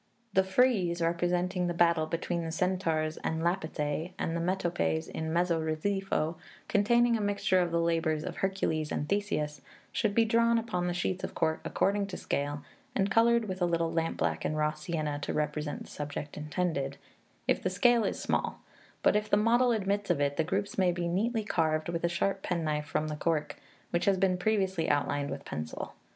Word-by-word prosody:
The 190 - +5
frieze, 190 -4 +2
representing 175 +2 0
the 175 - -2
battle 170 -2 +3
between 170 +1 -2
the 165 - -3
Centaurs 165 -3 0
and 160 0 -2
Lapithæ 160 -2 -1
and 165 - -2
the 170 - -1
metopes 175 -3 0
in 160 0 -4
mezzo 170 -1 +2
relievo, 160 0 -1 0.3
containing 235 +3 +3
a 220 - -1
mixture 200 -2 +2
of 175 -1 +1
the 170 0 +1
labours 165 -2 +1
of - - -5
Hercules 165 -5 -1
and 145 - -2
Theseus, 200 -7 -1 0.3
should 210 -3 0
be 230 - +5
drawn 230 +1 +3
upon 210 -6 -1
the 175 - -1
sheets 180 +1 -1
of - - -4
cork 160 0 0
according 200 +1 +1
to 195 - -6
scale, 145 0 -2 0.3
and 195 0 +1
coloured 230 +1 +4
with 185 -1 -5
a 175 - +3
little 165 -1 0
lampblack 165 0 0
and 155 - -1
raw 150 0 +2
sienna, 155 -2 -3
to - - -3
represent 150 0 -2
the - - -14
subject 145 0 -5
intended, 150 -3 -2 0.5
if - - +2
the - - 0
scale 240 -3 +4
is 195 - -1
small; - - -1 0.4
but - - +4
if 210 0 0
the 205 - +4
model 240 +3 +4
admits 200 -2 0
of 175 -5 +2
it, 145 0 +1
the 160 - +2
groups 195 +4 -2
may 185 -2 +4
be 175 0 -2
neatly 220 +6 0
carved 160 -4 0
with 170 -1 -2
a 170 - +3
sharp 195 +3 0
penknife 155 -5 -1
from 150 +2 -1
the 155 - -3
cork, 155 0 -1 0.4
which 170 +1 +1
has 195 -1 +4
been 185 -1 +2
previously 190 -3 0
outlined 145 0 +1
with - - -6
pencil. 80 +1 -5
175 Hz, 190 wpm, -30 LUFS, 155-195 Hz, 0.5 s, The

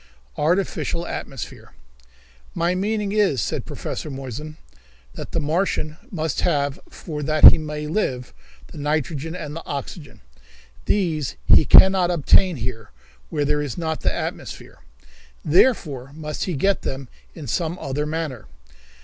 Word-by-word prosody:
Artificial 170 +1 0
Atmosphere. 135 -9 -7 0.8
"My 170 +2 +1
meaning 205 +2 -1
is," 205 - +2
said - - -2
Professor - - -5
Moissan, 135 +3 -7 0.6
"that - - -8
the - - 0
Martian 155 0 -1
must 160 -6 -2
have, 140 -1 0
for 150 -4 -7
that 155 +1 +8
he - - 0
may 150 -1 -5
live, 140 -7 -2 0.4
the - - -9
nitrogen 150 +2 -2
and 155 -4 -6
the 165 - -6
oxygen. 145 +2 -7 0.6
These 160 -9 0 0.3
can - - +11
he 190 - +2
not 185 -2 +1
obtain 175 +2 +4
here, 115 -3 -5 0.4
where 145 - -1
there 150 +1 +1
is 145 -5 -4
not 160 -2 -2
the - - +1
atmosphere. - - -6 0.7
Therefore 150 - +2
must 150 -1 -4
he 180 - -2
get 195 +8 +1
them 135 0 -5 0.3
in 155 - -8
some 165 +7 -2
other 145 -1 -3
manner. 155 -7 -4
155 Hz, 140 wpm, -22 LUFS, 140-175 Hz, 0.8 s, can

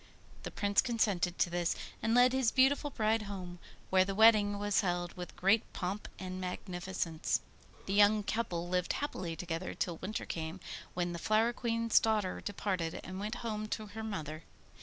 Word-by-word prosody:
The - - -5
Prince 205 -1 +2
consented 205 -8 0
to 175 - +2
this, 175 0 0 0.3
and 225 +1 +2
led 250 +1 +6
his 260 -3 +2
beautiful 275 +2 +3
bride 220 -3 +1
home, 185 -4 -6 0.3
where 185 0 +6
the 195 +1 -3
wedding 210 -2 +6
was 205 0 +2
held 175 -2 -1
with 180 -1 -7
great 195 +5 +2
pomp 190 +3 -3
and 185 0 -5
magnificence. 180 -2 -2 0.5
The 195 - -2
young 205 +1 +5
couple 190 -6 -2
lived 180 0 0
happily 185 - -3
together 170 +1 -4
till 170 -2 -2
winter 210 +6 -4
came, 160 +2 -4 0.4
when 175 -1 -1
the 170 - -5
Flower 220 +4 +2
Queen's 230 -2 +2
daughter 215 -4 0
departed 185 -5 -2
and 185 0 -6
went 210 +3 -3
home 215 -1 -2
to 215 0 -3
her 220 - -5
mother. 155 -7 -4
200 Hz, 170 wpm, -33 LUFS, 175-220 Hz, 0.5 s, led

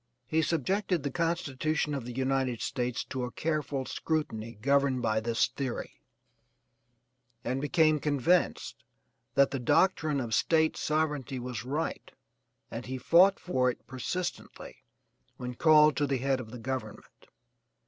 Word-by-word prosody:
He 160 +6 +1
subjected 175 +2 0
the 140 - -2
constitution 155 -2 -1
of 135 -4 -3
the 125 - -6
United 130 -1 0
States 125 -2 -2
to 130 -1 -4
a 125 - -3
careful 150 -4 -2
scrutiny 115 -10 -3
governed 140 +1 +2
by 110 -1 +2
this 115 +1 +1
theory, 130 - -5 1.4
and 130 +3 -2
became 155 0 +3
convinced 150 +5 0 0.5
that 140 0 +4
the 135 - -2
doctrine 155 +2 +2
of 115 -3 -3
State 160 +6 +3
sovereignty 150 -4 -1
was 125 -3 -5
right 150 +5 -3 0.6
and 115 +2 -6
he 130 +1 -3
fought 180 +9 +5
for 130 -8 +1
it 125 - -6
persistently 170 +8 -5 0.6
when 125 0 -5
called 150 +2 +5
to 145 - +1
the 135 -1 0
head 135 +1 0
of 115 -3 -8
the 125 - -8
government. 120 -2 -6
135 Hz, 140 wpm, -29 LUFS, 125-155 Hz, 1.4 s, fought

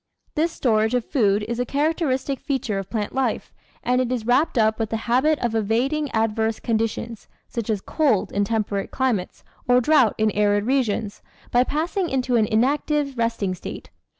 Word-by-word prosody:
This 325 +3 +1
storage 220 -4 +1
of 245 -2 0
food 210 -7 +2
is 235 +1 -3
a - - +2
characteristic 280 -1 -1
feature 245 -8 -2
of 195 - -7
plant 210 -3 -3
life, 265 -1 -1 0.3
and 250 +1 +2
it 250 -1 -2
is 240 -4 -2
wrapped 260 +5 +2
up 220 0 +2
with 220 -2 -1
the 225 - -1
habit 265 +6 +3
of 235 - -1
evading 245 +8 0
adverse 220 -1 0
conditions, 225 0 -2 0.2
such 235 -2 -5
as 210 -3 0
cold 275 - +1
in 205 - +1
tem 220 +1 0
perate 200 -1 -4
climates 240 -9 -2 0.3
or 245 0 +6
drought 255 -4 +4
in 215 0 +2
arid 205 0 +2
regions, 230 -5 -1 0.3
by 245 +1 +4
passing 335 +6 -1
into 255 -2 0
an 220 -2 +3
inactive 280 +5 +1
resting 230 -5 -1
state. 180 - -8
235 Hz, 175 wpm, -23 LUFS, 220-270 Hz, 0.3 s, or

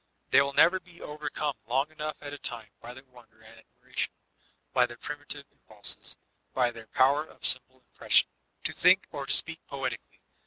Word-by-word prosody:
They - - +7
will 140 0 -1
never 185 +6 +5
be 175 -2 -18
overcome 150 0 -3
long 135 +5 0
enough 155 0 -5
at 145 -1 -7
a 145 - -7
time 115 -3 -5
by 120 +1 -10
their 130 - -12
wonder 120 -4 -20
and 110 +1 -16
admiration, 110 - -5 0.6
by 125 -1 +4
their 120 0 -11
primitive 145 0 -4
impulses, 105 -1 -4 0.4
by 125 -2 +2
their 115 -2 -12
power 140 +3 +3
of - - -8
simple 130 0 +6
impression, - - +3 0.4
to - - 0
think 185 +2 +5
or 140 -3 -5
to 140 - +1
speak 165 0 +1
poetically. 135 -3 -5
135 Hz, 180 wpm, -29 LUFS, 120-150 Hz, 0.6 s, They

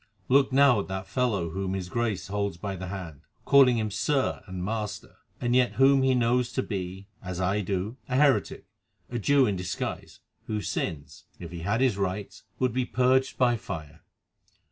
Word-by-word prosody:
Look 135 +1 +4
now 135 -4 +5
at 100 - -4
that 95 0 -4
fellow 100 -9 -1
whom 95 +1 -2
his 95 -2 -4
Grace 105 -4 -2
holds 100 -2 -2
by 100 +2 -4
the 95 0 -6
hand, 90 -6 -7 0.2
calling 135 -4 +6
him 110 -2 -1
'sir' 135 +6 0
and 90 -1 -5
'master,' 105 -1 -4 0.2
and 120 0 0
yet 125 -1 +3
whom 135 +1 +5
he 130 -1 +3
knows 120 0 +1
to 130 - 0
be, 95 -1 -5 0.2
as 90 -1 -5
I 95 +3 +1
do, 100 +4 -3
a 125 - -1
heretic, 140 0 +2 0.5
a 120 - -2
Jew 140 +5 +4
in 105 -4 0
disguise, 90 -2 -5 0.3
whose 105 -4 -3
sins, 70 -3 -4
if 85 -2 -9
he 85 - -6
had 100 +8 0
his 125 -7 +2
rights, 100 +1 -4
should 130 -3 0
be 130 +1 +1
purged 130 +1 +2
by 120 -2 +3
fire. 80 -10 -8
105 Hz, 185 wpm, -27 LUFS, 95-125 Hz, 0.5 s, calling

